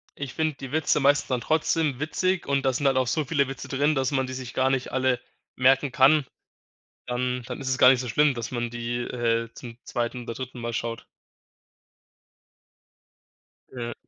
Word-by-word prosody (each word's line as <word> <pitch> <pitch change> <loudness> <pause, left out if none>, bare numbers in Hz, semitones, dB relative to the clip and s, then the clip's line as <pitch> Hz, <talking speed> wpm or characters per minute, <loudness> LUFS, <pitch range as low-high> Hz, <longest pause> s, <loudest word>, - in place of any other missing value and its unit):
ich 140 -2 -6
finde 155 -1 0
die 135 -1 -8
Witze 155 -1 +2
meistens 145 +1 +3
dann 125 -2 0
trotzdem 155 -1 +1
witzig 185 +4 0
und 140 -1 +1
das 130 -2 +2
sind 145 - -3
halt 135 -1 +3
auch 130 - +2
so 155 +2 0
viele 140 -1 +1
Witze 135 -1 -7
drin, 145 +3 +1
dass 135 0 0
man 130 -1 0
die 130 - -6
sich 130 -2 -7
gar 130 0 +2
nicht 130 -1 -1
alle 130 -1 +1 0.4
merken 130 +2 +3
kann, 135 +3 +5 0.8
dann 125 0 -2
dann 125 +1 -6
ist 135 - -4
es 130 0 0
gar - - +8
nicht 130 -2 +3
so 125 - -4
schlimm, 145 +4 +3
dass 115 -1 -5
man 120 -1 -2
die, 120 0 -3
äh, 115 -1 -1
zum 120 -1 -10
2. 120 +1 -3
oder 115 0 -6
3. 130 -2 -7
Mal 120 0 -3
schaut. 115 0 -4 2.7
Ja. 120 -2 -5
130 Hz, 190 wpm, -26 LUFS, 120-140 Hz, 2.7 s, gar